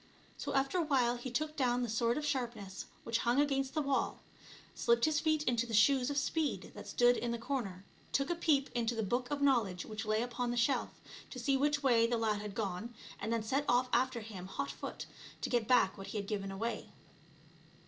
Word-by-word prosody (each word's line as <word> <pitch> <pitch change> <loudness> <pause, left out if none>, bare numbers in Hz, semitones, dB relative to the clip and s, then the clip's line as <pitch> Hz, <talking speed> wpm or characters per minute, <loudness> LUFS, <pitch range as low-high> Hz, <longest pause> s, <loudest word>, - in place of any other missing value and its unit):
So - - -4
after 275 +6 +2
a - - +2
while 250 -5 +2
he 240 +2 -5
took 305 +5 -2
down 250 -3 +1
the - - -1
Sword 230 +2 +1
of 300 - -2
Sharpness 235 -9 -3 0.2
which 230 0 0
hung 245 +3 +2
against 275 -1 +1
the 305 - +1
wall, 275 -1 0 0.6
slipped 235 0 +3
his 310 -1 +2
feet 310 -1 +1
into 240 -3 +1
the 225 - -1
Shoes 255 +4 +5
of 285 - -2
Speed 300 +1 -1
that - - -9
stood 245 0 +4
in 240 - -2
the 235 - -1
comer, 225 -7 -3 0.3
took 275 +4 +1
a - - +1
peep 295 -5 +2
into 235 -1 0
the 225 - -1
Book 245 +5 -1
of 285 -1 -1
Knowledge 225 -10 +2
which 215 -1 -5
lay 215 +1 +2
upon 245 0 -2
the 240 - -2
shelf, 240 +1 +2 0.4
to - - -8
see 275 -1 +1
which 290 +1 +1
way 235 -4 +5
the 240 0 0
lad 215 -2 0
had 210 -2 -6
gone, 215 +2 -3 0.2
and 220 - -3
then 230 -1 0
set 270 +6 0
off 250 +1 +3
after 245 0 +2
him 200 -4 -8
hot 190 - -3
foot, - - -6 0.4
to - - -2
get 240 -3 +1
back 225 -7 +4
what 195 - -7
he - - -4
had 200 - -2
given 200 -1 -3
away. 225 +5 -3
240 Hz, 220 wpm, -34 LUFS, 225-275 Hz, 0.6 s, Shoes